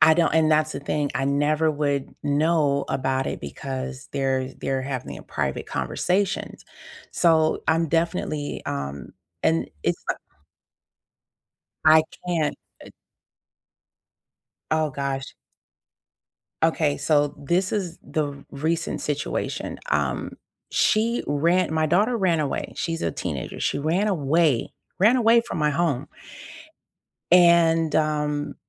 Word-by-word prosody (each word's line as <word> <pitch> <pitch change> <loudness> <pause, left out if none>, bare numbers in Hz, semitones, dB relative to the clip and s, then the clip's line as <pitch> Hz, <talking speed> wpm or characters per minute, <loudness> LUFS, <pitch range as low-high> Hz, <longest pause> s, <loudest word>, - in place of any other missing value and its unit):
I 160 0 +7
don't 170 0 +2
and 160 -1 +4
that's 155 0 +3
the - - -5
thing, 145 0 -1
I 135 - 0
never 150 +3 +2
would 145 -2 -1
know 145 -1 +2
about 130 0 -1
it - - -4
because 130 - -6
they're 135 -1 -1
they're 135 -1 -2
having 130 -2 -5
private - - -3
conversations. 195 +2 -1 0.5
So, 160 -2 +3
I'm 165 0 +2
definitely, 165 -2 -1
um 70 0 -4 0.3
and 165 0 +1
it's - - -1
like - - 0 1.7
I 155 0 +7 0.2
can't, 160 -4 0 0.3
uh - - -13 1.8
Oh 155 -1 +2
gosh. 135 -1 -4 1.3
Okay, 160 -3 +2
so, 145 -1 +2
this 180 +6 +1
is 180 -5 -2
the 145 -2 -3
recent 160 +4 -2
situation. 150 +1 -3
Um, - - 0 0.4
she 230 +2 +2
ra 170 +6 +2
my 160 0 +1
daughter 210 +9 +2
ran 180 -6 +2
away, 145 -2 -2
she's 165 -1 -3
a - - 0
teenager, 75 -8 -5
she - - 0
ran 170 +8 +1
away 155 - +2 0.3
ran 220 +6 +5
away 235 -1 +5
from 235 - -6
my 150 -1 +2
home 150 -4 0 1.3
and, 170 -2 +5
um, 150 -1 0
155 Hz, 120 wpm, -24 LUFS, 140-170 Hz, 1.8 s, I